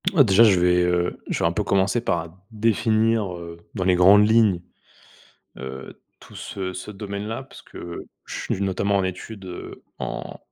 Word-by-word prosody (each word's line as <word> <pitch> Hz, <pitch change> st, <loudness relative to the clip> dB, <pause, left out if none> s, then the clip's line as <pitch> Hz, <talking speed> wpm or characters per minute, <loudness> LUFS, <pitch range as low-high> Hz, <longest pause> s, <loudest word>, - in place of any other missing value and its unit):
Heu 170 Hz, -7 st, +5 dB
déjà, 105 Hz, -1 st, +5 dB
je 100 Hz, -5 st, +5 dB
vais, 90 Hz, 0 st, +4 dB
heu, 90 Hz, 0 st, 0 dB
je -, -, -1 dB
vais -, -, +1 dB
un -, -, +3 dB
peu -, -, -1 dB
commencer 100 Hz, +4 st, +1 dB
par 85 Hz, -6 st, -2 dB, 0.2 s
définir, 110 Hz, -2 st, +1 dB
heu, 85 Hz, -1 st, -9 dB, 0.2 s
dans 95 Hz, -, -1 dB
les 90 Hz, 0 st, +3 dB
grandes 100 Hz, +4 st, +7 dB
lignes, 110 Hz, -5 st, +4 dB, 1.0 s
heu, 65 Hz, 0 st, -8 dB, 0.2 s
tout -, -, -15 dB
ce 95 Hz, -1 st, -5 dB
ce 90 Hz, +3 st, -7 dB
domaine-là 105 Hz, +4 st, -5 dB
puisque 135 Hz, -, -14 dB, 0.5 s
je -, -, -6 dB
suis 95 Hz, -, -3 dB
notamment 100 Hz, +1 st, +1 dB
en 95 Hz, -, +1 dB
étude, 95 Hz, +2 st, -6 dB
heu, 90 Hz, -1 st, -9 dB, 0.2 s
en, -, -, -5 dB
100 Hz, 170 wpm, -23 LUFS, 90-110 Hz, 1.0 s, grandes